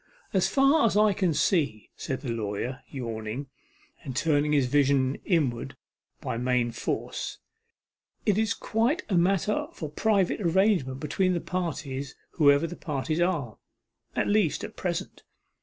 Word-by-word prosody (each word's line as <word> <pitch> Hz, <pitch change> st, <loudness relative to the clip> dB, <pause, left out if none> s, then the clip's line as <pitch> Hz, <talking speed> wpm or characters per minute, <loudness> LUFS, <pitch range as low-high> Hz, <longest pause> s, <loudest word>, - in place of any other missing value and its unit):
'As 190 Hz, -2 st, +3 dB
far 275 Hz, +3 st, +4 dB
as 205 Hz, -, 0 dB
I 210 Hz, -1 st, +5 dB
can 185 Hz, -3 st, +1 dB
see,' 150 Hz, -, 0 dB
said 130 Hz, -, -4 dB
the 130 Hz, -6 st, -3 dB
lawyer, 115 Hz, +4 st, -3 dB
yawning, 120 Hz, +1 st, -5 dB, 0.5 s
and 135 Hz, -5 st, -6 dB
turning 145 Hz, +1 st, +2 dB
his 145 Hz, -3 st, +3 dB
vision 135 Hz, 0 st, +2 dB
inward 145 Hz, -, 0 dB, 0.4 s
by -, -, -3 dB
main 125 Hz, -1 st, +1 dB
force, 115 Hz, -, -3 dB, 0.9 s
'it 205 Hz, -, +3 dB
is 220 Hz, 0 st, +1 dB
quite 250 Hz, +11 st, 0 dB
a 190 Hz, -, +1 dB
matter 195 Hz, -, +2 dB
for 155 Hz, -3 st, -6 dB
private 200 Hz, +3 st, +1 dB
arrangement 175 Hz, -7 st, +2 dB
between 185 Hz, +5 st, +1 dB
the -, -, 0 dB
parties, 145 Hz, -7 st, -4 dB, 0.2 s
whoever 145 Hz, -1 st, +4 dB
the 175 Hz, -, -5 dB
parties 155 Hz, +2 st, -2 dB
are 160 Hz, -, -1 dB, 0.6 s
at -, -, +1 dB
least 205 Hz, -7 st, +2 dB
at -, -, -7 dB
present. -, -, -4 dB
150 Hz, 140 wpm, -27 LUFS, 130-190 Hz, 0.9 s, I